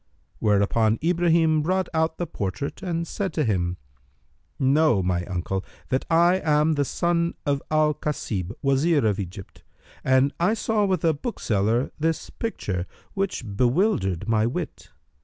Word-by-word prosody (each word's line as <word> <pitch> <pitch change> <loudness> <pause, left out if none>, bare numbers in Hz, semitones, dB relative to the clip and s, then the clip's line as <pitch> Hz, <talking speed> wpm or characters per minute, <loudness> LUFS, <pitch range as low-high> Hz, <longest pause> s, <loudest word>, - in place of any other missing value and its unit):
whereupon 110 +2 +2
Ibrahim 165 -2 +3
brought 185 +3 0
out 160 0 +1
the 175 - -2
portrait 105 - -4
and 170 -3 -2
said 195 +2 -3
to 155 - +1
him, 90 -6 0 0.8
"Know, 135 -6 +3
O 90 -1 0
uncle, 95 +1 -2 0.3
that 130 - 0
I 175 +3 +4
am 150 0 +3
the 145 -2 +1
son 170 +3 0
of 140 -2 +1
Al 155 0 +3
Kasib, 110 - -3
Wazir 140 +1 +3
of 105 -1 +1
Egypt, 95 0 -8 0.4
and 130 +2 +3
I 180 +6 +2
saw 215 -1 +1
with 185 -3 0
a 160 - +4
bookseller 120 - -1
this 160 +1 -1
picture, 95 - -3 0.3
which 195 -8 -2
bewildered 120 - +1
my 110 0 +2
wit. 120 - -5
150 Hz, 140 wpm, -24 LUFS, 105-170 Hz, 0.8 s, I